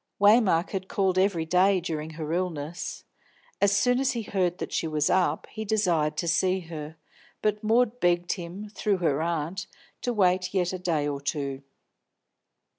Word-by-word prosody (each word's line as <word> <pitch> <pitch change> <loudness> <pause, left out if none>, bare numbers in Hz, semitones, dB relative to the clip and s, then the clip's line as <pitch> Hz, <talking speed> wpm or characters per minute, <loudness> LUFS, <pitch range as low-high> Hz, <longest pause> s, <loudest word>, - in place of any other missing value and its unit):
Waymark 205 -5 +4
had 190 -1 -3
called 190 -2 +1
every 185 -4 +1
day 185 +3 +3
during 160 -2 -4
her 155 0 -3
illness. 170 -2 -3 0.6
As 200 - +5
soon 245 +5 +3
as 265 -1 +1
he 235 -2 -3
heard 180 -4 0
that - - -5
she 165 - 0
was 155 -1 +1
up, 180 -5 +1
he 220 - -5
desired 175 -8 +1
to 170 - -1
see 185 +3 +2
her, 160 -2 -8 0.5
but 210 0 0
Maud 235 +2 +2
begged 175 -2 +2
him, 180 +4 -5
through 210 -2 0
her 155 -5 +1
aunt, 170 +2 -2 0.3
to 245 - -1
wait 185 -3 +1
yet 180 -1 +1
a 185 - -4
day 165 -5 0
or 140 -1 -3
two. 140 -2 -3
180 Hz, 170 wpm, -27 LUFS, 160-200 Hz, 0.6 s, As